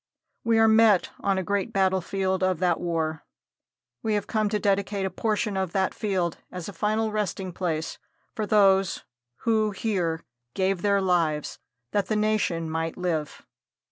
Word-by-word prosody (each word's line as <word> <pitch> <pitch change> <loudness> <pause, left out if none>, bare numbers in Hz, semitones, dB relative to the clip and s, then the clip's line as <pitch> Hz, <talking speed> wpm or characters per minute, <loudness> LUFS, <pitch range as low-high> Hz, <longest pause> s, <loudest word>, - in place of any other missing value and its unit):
We 230 -1 +3
are 225 0 +6
met 220 -3 +5
on 195 -1 +1
a 190 - 0
great 200 0 -1
battlefield 190 0 0
of 185 -1 +2
that 175 -1 +1
war. 160 -2 -2 0.8
We 220 -1 0
have 205 - -1
come 215 -1 0
to 210 - 0
dedicate 200 -1 0
a 190 - -2
portion 210 +1 -1
of 190 -3 -2
that 190 -1 +1
field 185 -5 -1
as 180 -2 -6
a 200 - -7
final 215 +4 0
resting 195 -3 -2
place 160 -3 -3 0.3
for 215 -1 -3
those 195 -3 +3 0.4
who 220 -2 +2
here 185 -6 -1 0.3
gave 190 -1 +1
their 200 -1 +2
lives 165 -5 0 0.3
that 200 -2 0
the 215 - 0
nation 210 -6 +1
might 165 +1 -3
live. 165 -5 -3
190 Hz, 160 wpm, -26 LUFS, 175-210 Hz, 0.8 s, are